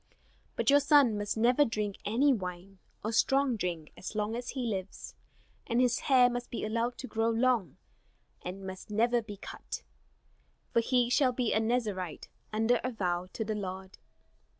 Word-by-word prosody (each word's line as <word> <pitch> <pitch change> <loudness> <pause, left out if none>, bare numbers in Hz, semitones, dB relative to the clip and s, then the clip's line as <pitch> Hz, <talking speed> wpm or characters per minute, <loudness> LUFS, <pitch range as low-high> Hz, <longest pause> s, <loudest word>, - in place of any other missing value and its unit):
But - - +2
your 285 - +7
son 285 -6 +5
must 205 +1 -2
never 245 +6 +4
drink 210 -5 -2
any 265 +7 +3
wine 185 -2 -6 0.2
or 220 - -1
strong 270 +2 +3
drink 175 -6 -4
as 190 - -7
long 210 +1 -1
as 240 0 -5
he 260 -3 -3
lives. 195 -4 -4 0.5
And 235 - +1
his 250 -1 +3
hair 255 -3 +5
must 245 0 -3
be 235 - -3
allowed 230 +3 -1
to 260 - -6
grow 225 -1 0
long 230 -3 +1 0.6
and 190 +2 -7
must 190 +1 -8
never 235 +3 +2
be 210 -2 -9
cut, - - -7 0.9
for - - +5
he 245 +1 +2
shall 255 -2 +3
be 245 -2 0
a 220 - +3
Nazarite 215 -7 -2 0.2
under 225 +2 +2
a 255 - 0
vow 180 -6 -2
to 220 - -3
the 215 - -1
Lord." 190 -1 -6
225 Hz, 175 wpm, -30 LUFS, 195-245 Hz, 0.9 s, your